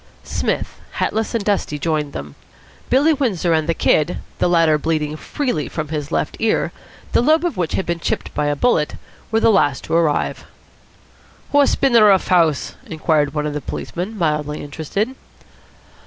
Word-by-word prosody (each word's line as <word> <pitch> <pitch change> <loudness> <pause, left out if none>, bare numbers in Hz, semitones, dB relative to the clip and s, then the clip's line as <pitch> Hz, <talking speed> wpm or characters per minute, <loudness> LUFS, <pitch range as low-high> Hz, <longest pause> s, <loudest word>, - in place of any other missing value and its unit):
Psmith, - - -2
hatless 220 +2 -1
and 215 -3 -1
dusty, 200 -7 0
joined 150 -1 -1
them. 70 - -7 0.6
Billy 290 +5 +4
Windsor 205 - 0
and 160 0 0
the 165 - +2
Kid, 155 +2 +2 0.2
the - - +2
latter 165 -3 +4
bleeding 155 -1 -1
freely 160 - -2
from 155 -2 -4
his 150 -1 -4
left - - -1
ear, 225 -1 +1 0.4
the - - +3
lobe 310 +6 +3
of 345 - -1
which 175 -3 -2
had 190 - -1
been 170 0 -2
chipped - - -3
by 150 - 0
a 145 - +1
bullet, 150 -3 +1 0.4
were 225 - +3
the 225 - +4
last 145 -10 +2
to - - -5
arrive. 165 -3 +1 1.1
"What's 285 -1 +4
bin 270 -3 +1
the 230 - +7
rough 200 -3 +5
house?" 165 -6 +2
inquired 155 -2 0
one 150 0 -1
of 150 - -2
the 150 - -3
policemen, 185 - -5
mildly 150 -3 -1
interested. 160 - -3
165 Hz, 170 wpm, -20 LUFS, 150-215 Hz, 1.1 s, the